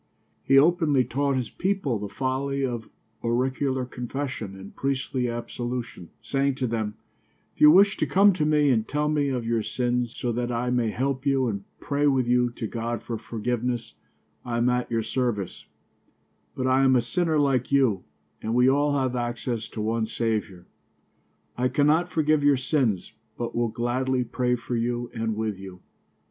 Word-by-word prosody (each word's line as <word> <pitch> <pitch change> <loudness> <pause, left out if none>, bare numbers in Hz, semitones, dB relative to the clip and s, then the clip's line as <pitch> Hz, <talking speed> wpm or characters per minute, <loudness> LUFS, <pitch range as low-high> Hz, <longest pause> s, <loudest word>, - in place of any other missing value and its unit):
He 135 - +4
openly 150 -3 +4
taught 140 +3 0
his 125 -3 -2
people 185 - -1
the 105 0 -5
folly 135 +4 -1
of 120 -3 -4 0.3
auricular 130 +2 0
confession 125 -4 -5
and 95 0 -11
priestly 130 -2 -1
absolution, 120 -5 -5
saying 135 +4 0
to 130 - -2
them: 110 -3 -2 0.6
"If - - -17
you 150 - +10
wish 195 +5 +6
to - - 0
come 200 +1 +5
to 175 -4 -1
me 150 -2 +3
and 110 -2 +1
tell 150 +1 0
me 145 -2 +1
of 125 -3 -2
your 115 -1 +1
sins, 120 +1 -1
so 120 - -1
that 120 +1 -2
I 120 +1 -1
may 120 -2 +1
help 130 +3 -2
you 135 -2 +2
and 100 -3 -3
pray 145 0 0
with 130 -3 +2
you 125 0 +3
to 120 -1 -6
God 115 +1 -3
for 115 - -4
forgiveness, 120 +1 -3 0.5
I 120 -1 -3
am 120 +1 +2
at 125 0 0
your 115 -1 0
service; 115 -4 -2 0.9
but 130 - -2
I 130 +1 +3
am 130 -1 +5
a 125 - +4
sinner 165 +3 0
like 135 -4 +1
you 125 -9 +3 0.4
and 110 +2 -2
we 125 +1 +5
all 145 +2 +3
have 130 -2 0
access 120 -1 -3
to 110 - -5
one 110 +1 0
Saviour. 110 -6 -2 0.9
I 125 - +3
cannot 150 +6 +2
forgive 155 -3 +2
your 145 -1 +5
sins, 125 - 0 0.2
but 120 -1 -4
will 120 0 +1
gladly 125 +3 0
pray 125 +1 0
for 120 0 -4
you 120 +1 -2
and 115 -2 -2
with 110 -3 -2
you." 95 -2 -10
125 Hz, 175 wpm, -25 LUFS, 115-140 Hz, 0.9 s, you